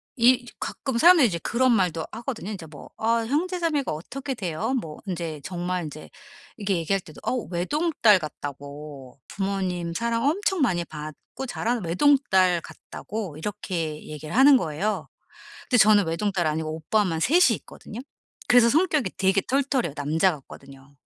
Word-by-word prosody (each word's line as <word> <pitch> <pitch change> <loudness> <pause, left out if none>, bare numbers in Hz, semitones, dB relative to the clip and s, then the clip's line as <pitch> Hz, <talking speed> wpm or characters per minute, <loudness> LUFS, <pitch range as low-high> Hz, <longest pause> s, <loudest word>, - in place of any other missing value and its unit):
이 245 +1 +4
가끔 265 -4 -3
사람들이 330 -2 +7
이제 170 -4 -2
그런 255 +1 +2
말도 180 -6 +1
하거든요. 230 -3 -5
인제 180 -6 -7
뭐 150 -2 -12
"아 230 +1 +1
형제자매가 330 -1 0
어떻게 265 - -5
돼요?" 200 +4 -2
뭐 155 -2 -9
인제 170 -5 -4
정말 180 0 -3
인제 150 +1 -9 0.5
이렇게 200 -3 -1
얘기할 180 +4 0
때도 155 -3 -14
어 - - -1 0.2
외동딸 225 - +3
같다고 145 -3 -8
부모님 185 -4 -2
사랑 230 +3 -1
엄청 385 +1 0
많이 175 -10 +1
받고 155 - -8
자란 240 -2 -2
외동딸 185 - +3
같다고 200 -4 -7
이렇게 165 -5 -4
얘기를 155 +1 -7
하는 275 +2 +7
거예요. 170 +4 -2 0.6
근데 250 - +4
저는 210 -3 +6
외동딸 175 +1 -1
아니고 155 0 -2
오빠만 165 0 0
3 335 - +5
이 - - +2
있거든요. 220 - -10 0.5
그래서 245 -1 +6
성격이 305 - +2
되게 195 +1 +2
털털해요. 265 - 0
남자 160 +5 +1
같거든요. 135 -1 -13
190 Hz, 340 characters per minute, -25 LUFS, 160-245 Hz, 0.6 s, 사람들이